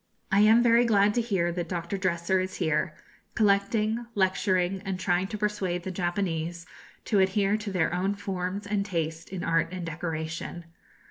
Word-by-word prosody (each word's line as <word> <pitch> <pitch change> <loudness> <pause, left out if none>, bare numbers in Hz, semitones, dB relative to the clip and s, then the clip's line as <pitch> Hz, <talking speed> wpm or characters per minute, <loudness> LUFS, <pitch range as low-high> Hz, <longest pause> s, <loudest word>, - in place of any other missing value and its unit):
I 195 - +4
am 220 +3 +6
very 235 0 +5
glad 210 -3 +4
to 240 - +2
hear 190 -7 0
that 175 0 -4
Dr. 175 +1 -3
Dresser 185 -1 0
is 185 0 -3
here, 155 -1 0 0.4
collecting, 215 +2 +2
lecturing, 185 -1 +1
and 190 -2 -3
trying 185 0 +1
to 210 - -5
persuade 200 -4 -1
the 190 - -4
Japanese 175 -2 -2 0.4
to 205 - +2
adhere 195 +1 +2
to 210 -1 -5
their 175 -3 +1
own 190 +3 0
forms 195 0 -4
and 200 0 0
taste 165 -4 -3
in 185 -2 -5
art 165 -1 +2
and 185 -2 -5
decoration. 165 +1 -4
185 Hz, 165 wpm, -27 LUFS, 175-205 Hz, 0.4 s, am